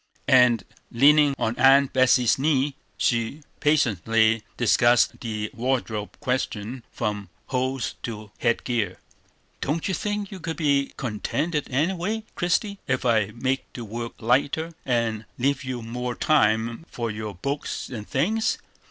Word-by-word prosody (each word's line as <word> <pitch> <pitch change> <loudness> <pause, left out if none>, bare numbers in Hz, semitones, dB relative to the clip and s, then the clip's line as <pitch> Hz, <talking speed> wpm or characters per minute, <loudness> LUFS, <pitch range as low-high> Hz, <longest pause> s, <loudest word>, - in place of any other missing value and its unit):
And, 125 -5 +6 0.3
leaning 145 +3 +5
on 110 +1 -1
Aunt 135 +1 +6
Betsey's 130 -1 +4
knee, 140 -1 +1 0.2
she 115 +5 0 0.2
patiently 115 - +3 0.2
discussed 120 0 +4
the 110 -2 -4
wardrobe 115 -4 -2
question 125 -1 -2
from 105 -4 -3 0.2
hose 130 0 -1
to 110 -3 -6
head 115 - +1
gear. 110 -7 -1 0.6
"Don't 155 +6 -1
you 190 - -1
think 205 +1 -2
you 190 - -7
could 165 -1 -4
be 140 -4 +2
contented 145 +7 -2
any 150 +8 +1
way, 210 +5 -2
Christie, 200 +3 0
ef 130 -1 0
I 110 -4 +3
make 130 +2 -2
the 120 - -6
work 115 +2 -5
lighter, 140 +8 +1
and 115 -3 0
leave 135 +2 0
you 130 -2 -4
more 125 +2 -4
time 115 -2 +2
for 115 -2 -3
your 105 -2 -5
books 140 - -3
and 110 -5 -7
things?" 215 +11 +1
125 Hz, 135 wpm, -25 LUFS, 115-145 Hz, 0.6 s, And